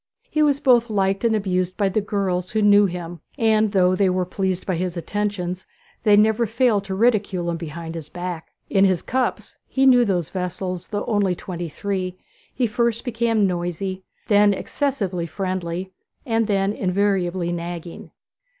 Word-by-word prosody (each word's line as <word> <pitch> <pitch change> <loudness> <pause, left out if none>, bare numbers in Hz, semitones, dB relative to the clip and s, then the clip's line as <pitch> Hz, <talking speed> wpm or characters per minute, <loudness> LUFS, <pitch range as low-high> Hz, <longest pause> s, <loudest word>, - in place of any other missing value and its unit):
He 305 - +1
was 285 -2 +3
both 240 -4 +4
liked 195 -1 0
and 230 -1 +3
abused 185 -3 -1
by 200 - +2
the 195 +3 0
girls 190 -3 -1
who 215 -1 0
knew 205 0 +6
him, 175 -1 -6 0.2
and 220 -3 +3
though 185 -2 +3
they 190 0 +3
were 185 0 0
pleased 190 0 -2
by 185 - -1
his 180 +1 -3
attentions, 185 0 -3 0.3
they 210 -2 +5
never 220 +2 +3
failed 225 -3 +2
to 190 -1 -3
ridicule 200 -5 +1
him 170 - -3
behind 165 0 -6
his 160 -3 -7
back. 175 -1 -5 0.2
In 195 - +3
his 185 -3 +2
cups 255 0 -2
(he 270 0 +1
knew 250 -2 +7
those 180 -7 0
vessels, 180 -1 -4
though 205 -1 -3
only 200 -4 +1
twenty 175 -1 -6
three) 185 +1 -3 0.3
he 255 - 0
first 235 +1 0
became 230 -3 +1
noisy, 180 +1 -2 0.3
then 205 -1 +5
excessively 195 - -2
friendly, 185 0 -3 0.3
and 225 -2 +1
then 200 -1 +1
invariably 185 -3 0
nagging. 170 0 -6
195 Hz, 165 wpm, -22 LUFS, 180-215 Hz, 0.3 s, knew